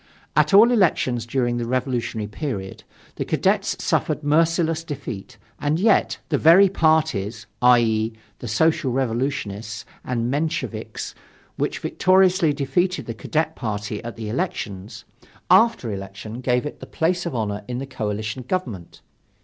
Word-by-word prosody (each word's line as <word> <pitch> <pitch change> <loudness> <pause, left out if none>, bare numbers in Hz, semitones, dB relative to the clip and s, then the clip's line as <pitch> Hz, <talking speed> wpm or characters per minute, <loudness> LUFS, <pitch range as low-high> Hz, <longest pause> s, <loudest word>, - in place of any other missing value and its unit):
At - - +4
all 215 +5 +7
elections 130 - +2
during 120 -1 0
the 120 -1 -2
revolutionary 120 -3 -1
period, 105 -4 -5 0.3
the - - -1
Cadets - - +1
suffered 150 - 0
merciless 165 +2 +2
defeat, 130 -10 -7 0.2
and 150 +3 0
yet, 215 +1 +3
the - - +1
very 180 +5 +7
parties 155 - +1 0.2
i.e., 115 -3 +4 0.3
the 120 - -6
Social 135 +4 +2
Revolutionists 115 -4 -2 0.2
and 120 -1 -1
Mensheviks 155 +3 -3 0.4
which - - -1
victoriously 185 -3 +3
defeated 145 +2 0
the 115 - -4
Cadet 155 +8 -1
party 105 -2 -4
at 115 0 -6
the 115 -2 -6
elections, 105 - -4 0.5
after 225 - +4
election 100 +4 -7
gave 125 +1 +1
it 150 - -6
the - - -9
place 175 +1 0
of 145 - -4
honor 105 -2 -2
in 125 -1 -3
the 135 - -4
coalition 110 -2 -4
government. 120 - -4
125 Hz, 135 wpm, -23 LUFS, 110-160 Hz, 0.5 s, all